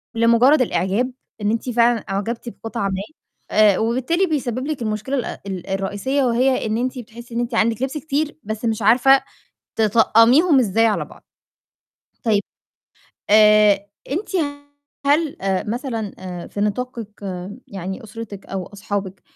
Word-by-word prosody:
لمُجرد 235 +5 +5
الإعجاب 200 +4 0 0.3
إن 205 +1 +1
أنتِ 230 +2 -2
فعلًا 240 0 +3
أُعجبتِ 225 +5 -3
بقطعة 225 -3 -4
ما، 190 0 -2 0.5
آآ 210 -3 +5
وبالتالي 255 +11 +1
بيسبب 260 -4 -2
لِك 300 -6 -3
المشكلة 215 +5 -2
الأ 245 - -4
ال 190 -1 -5
الرئيسية 200 +8 -1
وهي 255 +1 +2
إن 215 - 0
أنتِ 255 +2 -2
بتحسي 235 +1 -11
إن - - 0
أنتِ 240 0 -2
عندِك 225 +1 +1
لِبس 270 +3 -2
كتير 300 0 -2
بس 215 +2 -4
مش 220 -1 -1
عارفة 260 +5 +6 0.6
تطقميهم 230 - +5
إزاي 225 0 +3
على 220 - 0
بعض. - - -16 1.0
طيب 215 -3 +2 0.9
آآ 210 -1 +6 0.2
أنتِ 350 +10 -2 0.8
هل 295 +1 +2
آآ 190 -1 0
مثلًا 230 -3 -3
آآ 180 -2 -7
في 205 - -6
نطاقِك 230 +2 -2 0.6
يعني 190 +2 -6
أُسرتِك 215 -2 -9
أو 190 -2 -4
أصحابِك 200 -2 -5
230 Hz, 140 wpm, -21 LUFS, 205-255 Hz, 1.0 s, عارفة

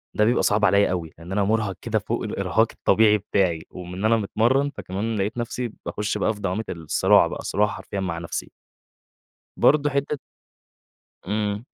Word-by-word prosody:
ده 105 - +3
بيبقى 120 +2 +2
صعب 105 0 +3
عليّا 100 0 +4
أوي. 85 -4 -3
لأن 85 +3 -11
أنا 100 +1 +1
مُرهَق 105 -1 0
كده - - 0
فوق - - -3
الإرهاق - - +1
الطبيعي 105 -1 +4
بتاعي، 95 -5 0
ومن 90 0 -9
إن 95 +4 -3
أنا 115 +1 +4
متمرِّن، 120 +7 +1
فكمان 110 -3 -4
لقيت 100 +4 -2
نفسي 120 0 -3
باخش 105 0 -2
بقى 110 - +1
في 105 - -12
دوامة 100 +3 -1
الصراع 80 -3 +3
بقى - - -6
صراع 105 +2 +1
حرفيًا 100 - -6
مع 90 -3 -2
نفسي. 85 0 -5 1.1
برضه 145 0 +4
حتة 140 +1 -1 1.1
إمم. 105 +1 -1
105 Hz, 170 wpm, -24 LUFS, 95-110 Hz, 1.1 s, عليّا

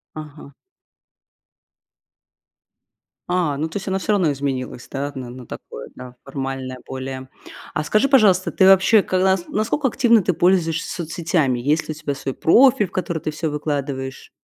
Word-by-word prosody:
Ага. 150 -2 -10 2.8
А, 175 -6 0
ну 155 +3 -2
то 160 - -9
есть 195 -1 -4
оно 190 0 0
всё 210 - -1
равно 175 -7 +2
изменилась, 130 -3 -4
да? 140 +1 -3
Н-а 125 -3 -7
на 125 -1 -10
такое, - - -9
да, 125 -1 -10
формальное 135 -2 -5
более. 130 0 -6 0.5
А 155 - -1
скажи 215 - +2
пожалуйста, 205 -9 +4
ты 190 - +2
вообще, 195 +3 +6
как 185 -1 0
нас 190 -2 +2
насколько 230 +7 0
активно 230 -3 +3
ты 185 - +1
пользуешься 170 -2 +1
соцсетями, 155 -6 0
есть 150 +5 0
ли 155 - -2
у - - -8
тебя 145 -2 -4
свой 135 -1 -5
профиль, 250 +3 +5
в - - -25
который 170 -3 -2
ты 155 - -3
всё 155 +1 -3
выкладываешь? 140 -3 -4
155 Hz, 160 wpm, -21 LUFS, 135-190 Hz, 2.8 s, вообще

